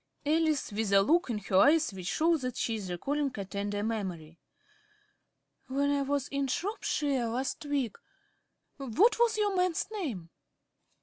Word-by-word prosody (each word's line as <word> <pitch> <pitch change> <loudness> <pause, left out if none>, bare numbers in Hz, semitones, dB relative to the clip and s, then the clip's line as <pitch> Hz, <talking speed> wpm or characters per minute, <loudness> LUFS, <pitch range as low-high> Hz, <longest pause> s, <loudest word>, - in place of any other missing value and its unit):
~Alice~ 310 -3 +1
(with 210 0 -2
a 195 0 +6
look 335 - +2
in 230 - -1
her 195 -2 0
eyes 305 +2 +5
which 185 -2 -7
shows 325 - +2
that 255 -1 -4
she 230 - -1
is 205 -4 -4
recalling 275 +11 -1
a 200 - -4
tender 205 +1 -3
memory). 180 -8 -4 1.3
When 280 +2 +1
I 285 -1 +1
was 280 0 -1
in 280 -1 -1
Shropshire 285 - -1
last 255 +6 -3
week 275 -7 -1 0.8
What 285 - +2
was 470 -2 +3
your 410 -2 +1
man's 360 -2 +1
name? 245 - -5
270 Hz, 150 wpm, -30 LUFS, 205-310 Hz, 1.3 s, a